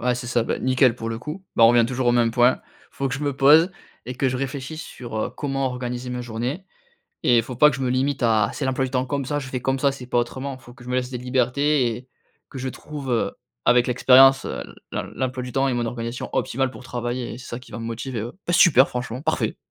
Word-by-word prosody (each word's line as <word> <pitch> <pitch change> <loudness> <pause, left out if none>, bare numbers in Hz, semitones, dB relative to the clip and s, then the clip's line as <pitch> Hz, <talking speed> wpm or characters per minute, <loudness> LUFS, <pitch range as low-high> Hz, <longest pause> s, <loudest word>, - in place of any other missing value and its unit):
Ouais, 125 0 +1
c'est 125 0 -6
ça, 120 -1 +1
bah, - - -2
nickel 130 -2 +3
pour 115 - -5
le 115 0 -3
coup, 155 +9 -7
bah, 115 - +6
on 115 - +9
revient 120 -1 +5
toujours 130 0 -2
au - - +4
même 120 -1 +3
point, 125 +2 +3 0.3
il - - -26
faut 135 -1 -1
que 125 - -3
je 135 - -5
me 140 -2 -1
pose 155 +6 +6 0.4
et 125 - -5
que 130 +1 +1
je 130 - -2
réfléchisse 135 +4 -5
sur, 120 -3 -8
heu, 110 - -1
comment 135 -2 -2
organiser 125 0 -4
ma 125 0 -3
journée 120 +9 -4 0.6
et 120 - +5
il 115 - +3
faut 125 0 -7
pas 150 +4 +6
que 135 - -3
je 135 - -6
me 130 - 0
limite 130 +2 0
à: 110 -3 +3
«C'est - - -4
l'emploi 130 0 0
du 130 - -7
temps 130 -1 0
comme 140 +1 -2
ça, 145 +2 -1
je 135 - -7
fais 130 -1 -3
comme 135 +2 -1
ça, 140 +1 +3
c'est 135 -2 -9
pas 120 - 0
autrement», 130 +3 -4
il - - -22
faut 120 - -14
que 120 0 -15
je 125 - -9
me 125 - 0
laisse 125 0 -1
des 125 - -4
libertés 130 +1 +1
et 125 +2 -11 0.4
que 135 - -9
je 130 +1 -3
trouve, 145 0 -8
heu, 115 - +1 0.3
avec 120 0 +5
l'expérience, 130 +2 +6
heu, - - -4
l - - -10 0.2
l'em - - -4
l'emploi 130 -1 -2
du 125 - -6
temps 135 +2 +1
et 130 - 0
mon 120 -1 -1
organisation 115 +1 -5
optimale 135 +1 -1
pour 125 - -12
travailler 120 0 -4
et - - -8
c'est 130 - -11
ça 120 - -5
qui 125 - -16
va - - -6
me 115 - -5
motiver, 115 +1 -4
heu. 120 +2 -6
Bah, 175 - 0
super 145 -6 +6
franchement. 125 +1 -5
Parfait! 160 0 -1
125 Hz, 280 wpm, -23 LUFS, 120-135 Hz, 0.6 s, on